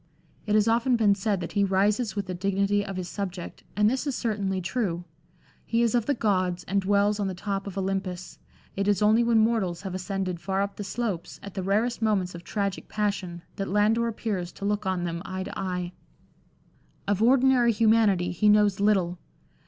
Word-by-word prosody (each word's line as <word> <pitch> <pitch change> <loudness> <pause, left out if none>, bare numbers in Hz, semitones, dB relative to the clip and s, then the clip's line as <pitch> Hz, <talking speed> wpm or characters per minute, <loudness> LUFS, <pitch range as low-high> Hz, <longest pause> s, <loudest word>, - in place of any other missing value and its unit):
It 210 - +2
has 215 0 +4
often 235 +2 +3
been 215 -3 +4
said 200 -1 -1
that 170 - -5
he 200 - +2
rises 200 +3 +1
with 200 -1 -2
the 185 - -4
dignity 200 +2 +1
of 195 -1 -6
his 185 -1 -4
subject, 185 -2 -6
and 210 0 +4
this 260 +5 0
is 275 - -1
certainly 200 -5 -1
true. 180 -2 -2 0.6
He 230 0 +1
is 230 - +2
of 240 -3 +1
the 285 - +2
gods 185 -5 0
and 200 +1 0
dwells 205 +2 +2
on 200 - 0
the 190 - -3
top 195 +1 -3
of 200 0 -7
Olympus; 190 -2 -3 0.4
it 195 +1 -1
is 205 0 +2
only 220 +3 +5
when 235 -1 +3
mortals 215 -5 +1
have 190 -2 -5
ascended 185 -1 -3
far 195 +2 -1
up 200 0 -5
the 205 - -4
slopes, 200 -4 -4
at 200 - -8
the 195 - -3
rarest 215 +6 0
moments 200 -5 +1
of 170 0 -9
tragic 200 -1 -3
passion, 195 -5 -2
that 195 -1 -2
Landor 215 +4 +2
appears 205 -6 -3
to 200 - -7
look 205 -1 -1
on 185 -2 0
them 170 -1 -3
eye 185 0 -4
to - - -7
eye. 180 -2 -3 1.1
Of 205 0 +1
ordinary 250 0 +5
humanity 215 -5 +3
he 210 +5 +2
knows 210 -2 +4
little. 190 -4 +2
200 Hz, 200 wpm, -26 LUFS, 185-215 Hz, 1.1 s, only